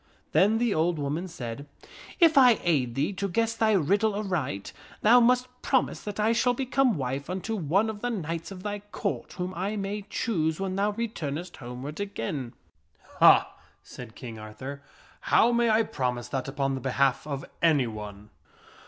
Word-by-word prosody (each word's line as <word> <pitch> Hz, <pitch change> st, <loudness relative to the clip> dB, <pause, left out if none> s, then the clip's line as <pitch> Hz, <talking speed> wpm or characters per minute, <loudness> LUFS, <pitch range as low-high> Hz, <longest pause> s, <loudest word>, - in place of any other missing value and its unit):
" -, -, -37 dB
Then 210 Hz, +4 st, +4 dB
the 235 Hz, -2 st, +1 dB
old 165 Hz, +2 st, +1 dB
woman 150 Hz, +5 st, -2 dB
said, 130 Hz, -4 st, -7 dB, 0.3 s
" -, -, -16 dB
If 330 Hz, -3 st, +6 dB
I 250 Hz, -5 st, +7 dB
aid 135 Hz, -9 st, +1 dB
thee 150 Hz, +8 st, 0 dB
to 195 Hz, +1 st, -3 dB
guess 225 Hz, +4 st, 0 dB
thy 220 Hz, -1 st, +2 dB
riddle 200 Hz, +4 st, +2 dB
aright, 165 Hz, -, -3 dB, 0.3 s
thou 235 Hz, +4 st, +7 dB
must 250 Hz, +1 st, +3 dB
promise 260 Hz, -2 st, +1 dB
that 205 Hz, 0 st, -6 dB
I 215 Hz, +2 st, +3 dB
shall 245 Hz, +1 st, +2 dB
become 260 Hz, -4 st, +1 dB
wife 135 Hz, +2 st, -3 dB
unto 190 Hz, +5 st, -3 dB
one 190 Hz, +4 st, +1 dB
of 215 Hz, -1 st, -5 dB
the 245 Hz, -, -1 dB
knights 165 Hz, -6 st, -4 dB
of 185 Hz, -1 st, -9 dB
thy 205 Hz, 0 st, -3 dB
Court, -, -, -3 dB
whom 180 Hz, 0 st, -4 dB
I 195 Hz, +5 st, -2 dB
may 205 Hz, +1 st, -3 dB
choose 160 Hz, -8 st, -1 dB
when 190 Hz, -1 st, -2 dB
thou 205 Hz, +2 st, +1 dB
returnest 180 Hz, -8 st, -4 dB
homeward 130 Hz, +5 st, -7 dB
again." 135 Hz, -, -4 dB, 0.3 s
" -, -, -23 dB
Ha! -, -, +6 dB
" -, -, -32 dB
said 120 Hz, -3 st, -11 dB
King 115 Hz, -3 st, -8 dB
Arthur, 120 Hz, +7 st, -8 dB, 0.2 s
" -, -, -27 dB
how 235 Hz, -, +6 dB
may 235 Hz, -1 st, +2 dB
I 220 Hz, +1 st, +4 dB
promise 125 Hz, -, -3 dB
that 135 Hz, -1 st, -3 dB
upon 135 Hz, 0 st, -1 dB
the 135 Hz, -, -4 dB
behalf 135 Hz, +1 st, +1 dB
of 140 Hz, -2 st, -4 dB, 0.2 s
anyone?" 110 Hz, -10 st, 0 dB
180 Hz, 185 wpm, -27 LUFS, 135-215 Hz, 0.3 s, I